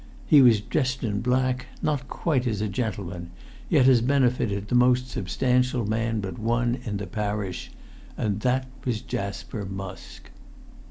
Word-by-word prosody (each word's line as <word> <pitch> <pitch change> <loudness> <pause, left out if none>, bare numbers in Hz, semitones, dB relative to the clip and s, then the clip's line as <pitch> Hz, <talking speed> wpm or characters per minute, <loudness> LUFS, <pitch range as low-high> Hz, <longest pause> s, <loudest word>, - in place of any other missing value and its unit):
He 150 -3 +7
was 115 -5 +6
dressed 130 +2 -1
in 105 -3 -1
black, 125 0 0 0.2
not 145 -4 0
quite 135 -7 0
as 110 -4 -1
a 105 - 0
gentleman, 95 -5 -4 0.4
yet 140 -6 +5
as 125 -3 +6
befitted 120 -6 +1
the - - -4
most 125 +1 +4
substantial 125 +3 0
man 110 +1 0
but 95 -3 -6
one 120 +2 0
in 105 -3 -2
the 100 - -4
parish. 105 -3 -3 0.5
And 105 -1 -1
that 130 +3 +1 0.2
was 115 -4 -1
Jasper 100 +2 -4
Musk. 95 -1 -8
115 Hz, 150 wpm, -26 LUFS, 100-125 Hz, 0.5 s, He